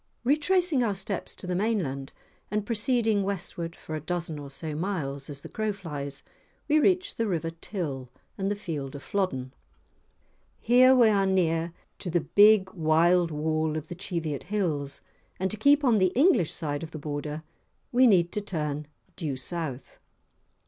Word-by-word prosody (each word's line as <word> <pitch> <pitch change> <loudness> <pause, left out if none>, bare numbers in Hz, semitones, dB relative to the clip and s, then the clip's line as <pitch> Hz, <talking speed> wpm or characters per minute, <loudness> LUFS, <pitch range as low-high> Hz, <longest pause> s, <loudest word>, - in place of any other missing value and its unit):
Retracing 305 +2 +2
our 210 -4 0
steps 195 0 -4
to - - -9
the 180 - -2
mainland, 175 -10 -1 0.4
and 210 0 -1
proceeding 225 -1 +2
westward 180 -3 -3
for 155 - -9
a 155 - -3
dozen 165 -1 -3
or 140 -1 -8
so 155 +3 -5
miles 150 -5 -3
as 140 -1 -7
the - - -8
crow 215 -1 -2
flies, 145 -8 -6 0.4
we 305 +1 +4
reach 360 +3 +2
the 230 - 0
River 165 -4 -1
Till, 140 - -4 0.3
and 195 0 -1
the 205 - 0
field 150 -9 -5
of 140 - -8
Flodden. 130 -9 -2 1.1
Here 255 +2 +6
we 240 -3 +6
are 200 -2 +3
near 170 -3 +1 0.3
to 180 - -4
the 175 0 +1
big 205 +1 +5
wild 170 +2 +3
wall 155 0 -1
of 155 0 -6
the 175 - -5
Cheviot 165 -6 -3
hills, 160 -9 -2 0.4
and 190 +1 0
to 215 - -4
keep 285 +6 +4
on 235 -5 +4
the 185 -1 +3
English 275 - +4
side 145 -2 -2
of 165 - -6
the 160 - -7
border 150 +1 -4 0.5
we 255 +1 +6
need 175 -5 +4
to 210 - -2
turn 150 -6 -3 0.3
due 145 -6 -3
south. 140 -2 -5
175 Hz, 170 wpm, -27 LUFS, 150-210 Hz, 1.1 s, Here